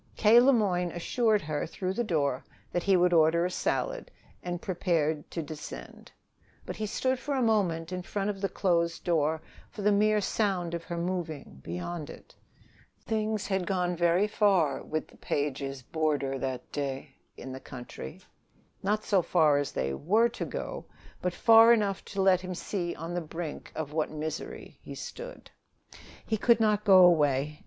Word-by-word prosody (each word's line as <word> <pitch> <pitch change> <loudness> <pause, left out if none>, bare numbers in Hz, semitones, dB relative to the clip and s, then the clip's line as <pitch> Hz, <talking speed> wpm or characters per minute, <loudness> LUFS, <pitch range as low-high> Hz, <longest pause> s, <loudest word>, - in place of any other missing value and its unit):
K. 225 +2 +7
Le 260 +3 +6
Moyne 185 -7 +1
assured 215 +4 +1
her 150 -1 -2
through 185 +3 -3
the 240 - -1
door 145 - 0 0.3
that 175 - 0
he 195 +1 +3
would 175 0 +3
order 165 +1 +4
a 180 - -2
salad, - - -2 0.3
and 175 -1 -4
prepared 165 -5 -1
to 165 - -4
descend. 150 0 -9 0.5
But - - -5
he 215 - -3
stood 260 +4 0
for 285 +2 -3
a 265 - +1
moment 180 -7 +1
in 180 0 -3
front 200 +3 -2
of 195 -1 -10
the 195 - 0
closed 170 -3 0
door, 160 -2 +1 0.3
for 205 - -8
the 210 - +4
mere 210 +1 +3
sound 190 -4 -1
of 170 -1 -3
her 170 - -5
moving, 170 - -4
beyond 150 - -5
it. - - -13 0.7
Things 215 -1 -1
had 190 -3 -1
gone 180 -2 0
very 175 +4 +3
far 195 -9 +2
with 155 0 -4
the - - -20
Pages' 135 -2 -3
roomer 145 -4 0
that 130 -1 -4
day 135 -1 -4 0.2
in 130 - -8
the 130 - -7
country; 120 - -9 0.6
not 210 +2 0
so 195 -3 +3
far 155 -5 +3
as 145 - -2
they 65 +1 -2
were 215 - +2
to 235 - -5
go, - - -5 0.4
but 180 - 0
far 225 +2 +7
enough 205 -4 0
to 195 -1 -2
let 185 -1 +4
him 185 0 -5
see 175 -1 -3
on 165 +2 -6
the 175 - -1
brink 160 0 -6
of 150 -2 -4
what 155 -1 0
misery 155 0 -6
he - - -9
stood. - - -9 0.7
He 220 - 0
could 235 +2 +4
not 210 -1 +2
go 185 -2 +8
away. 150 -3 +2
175 Hz, 175 wpm, -29 LUFS, 155-205 Hz, 0.7 s, go